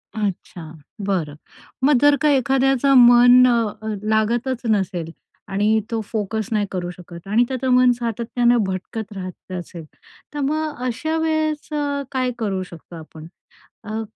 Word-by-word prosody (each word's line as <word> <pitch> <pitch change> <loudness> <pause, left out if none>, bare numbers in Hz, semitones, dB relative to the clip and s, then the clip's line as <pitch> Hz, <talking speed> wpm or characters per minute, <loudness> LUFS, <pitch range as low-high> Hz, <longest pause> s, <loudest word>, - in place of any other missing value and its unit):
अच्छा. 180 -6 -5 0.3
बरं. 180 -7 -2 0.5
मग 285 -2 +5
जर 290 0 +6
का 300 - +3
एखाद्याचा 270 0 +2
मन 245 +1 +7
अ, 225 -2 -1 0.2
लागतच 235 +4 0
नसेल 185 -5 -1 0.4
आणि 210 +3 +1
तो 230 - -1
फोकस 220 -1 -3
नाही 210 -1 +1
करू 180 -2 -3
शकत 175 0 -12
आणि 220 +4 +3
त्याचं 260 0 -3
मन 250 0 +5
सातत्याने 235 +1 0
भटकत 205 +3 -5
राहत 185 -1 -9
असेल, 175 -2 -7 0.5
तर 295 - -5
मग 300 -1 -2
अशा 315 +7 -2
वेळेस 315 -1 -1
अ, 285 -1 -1
काय 255 -2 -1
करू 195 -4 -2
शकतो 170 -1 -13
आपण? 160 0 -11 0.6
अ, 215 +1 -4
225 Hz, 140 wpm, -21 LUFS, 190-260 Hz, 0.6 s, मन